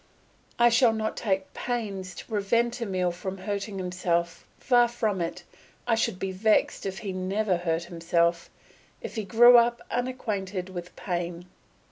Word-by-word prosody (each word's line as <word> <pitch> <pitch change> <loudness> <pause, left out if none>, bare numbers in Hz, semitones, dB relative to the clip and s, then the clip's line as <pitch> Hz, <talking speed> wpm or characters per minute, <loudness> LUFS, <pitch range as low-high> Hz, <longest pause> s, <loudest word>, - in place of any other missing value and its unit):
I 240 0 +6
shall 235 0 +4
not 220 0 -2
take 190 -3 -2
pains 200 -7 -4
to - - -9
prevent 235 +3 0
Emile 185 -5 0
hurting 195 +3 -4
himself; 175 -2 -2
far 245 -2 +4
from 220 -5 -1
it, 170 +1 -4 0.4
I 240 - +1
should 225 -4 0
be 190 0 -3
vexed 205 +1 +1
if 190 0 -4
he 195 - -2
never 185 +1 0
hurt 165 -1 -1
himself, 170 0 0 0.5
if - - -6
he 220 - -3
grew 240 +5 +7
up 235 0 +1
unacquainted 205 -7 -3
with 175 -1 -8
pain. 175 -1 -4
195 Hz, 145 wpm, -27 LUFS, 180-230 Hz, 0.5 s, grew